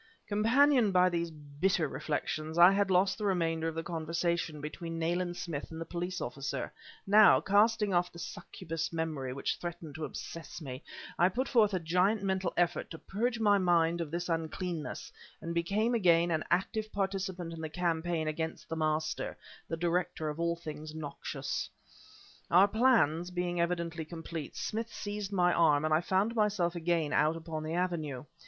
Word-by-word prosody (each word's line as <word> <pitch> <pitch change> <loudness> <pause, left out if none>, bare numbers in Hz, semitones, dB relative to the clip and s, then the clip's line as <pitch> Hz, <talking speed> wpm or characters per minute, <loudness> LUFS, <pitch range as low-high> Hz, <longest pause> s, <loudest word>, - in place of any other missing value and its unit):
Companioned 230 +2 +4
by 180 0 +5
these 170 -1 -1
bitter 155 +3 -1
reflections, 155 +2 -3
I 175 +2 +9
had 200 0 +2
lost 190 +2 +3
the - - -4
remainder 165 -4 +1
of 165 - -3
the 165 - -3
conversation 170 -1 -2
between 165 +3 -6
Nayland 175 +2 -1
Smith 155 -5 -5
and 160 - -7
the 165 - -4
police 175 +2 -4
officer; 140 0 -4 0.3
now, 205 +1 +7
casting 210 0 +3
off 175 0 +2
the - - -13
succubus 165 -1 -5
memory 160 -6 -3
which 135 +2 -2
threatened 170 -3 -6
to 155 0 -4
obsess 165 +2 -7
me, 135 -4 -7 0.4
I 175 - +5
put 255 +8 -1
forth 210 -5 +4
a - - +1
giant 180 +6 +2
mental 190 -2 0
effort 175 0 +1
to 165 - -7
purge 230 +7 -2
my 205 -2 +4
mind 170 -2 +3
of 165 - -3
this 175 +3 -3
uncleanness, 165 0 -3 0.3
and 170 - -5
became 200 +8 +1
again 175 -6 +4
an 160 -1 0
active 215 +5 0
participant 190 -3 -2
in 165 - -7
the 160 - -4
campaign 165 -1 -1
against 160 +1 -4
the 165 - -2
Master 155 0 -1 0.3
the 165 - -3
director 170 -2 -1
of 150 +2 -6
all 170 0 +1
things 155 -2 -8
noxious. 155 -2 -4 0.8
Our 185 +4 +7
plans 205 - +3
being 175 -1 -1
evidently 170 -1 -2
complete, 165 -1 -7
Smith 225 +1 -3
seized 205 -1 -5
my 180 -2 +3
arm, 155 -3 +4
and 155 - +2
I 155 - +4
found 195 +6 +1
myself 205 -6 +1
again 170 -3 0
out 155 +2 +3
upon 160 -1 -5
the 155 +2 -3
avenue. 160 -7 -2
170 Hz, 170 wpm, -31 LUFS, 160-190 Hz, 0.8 s, I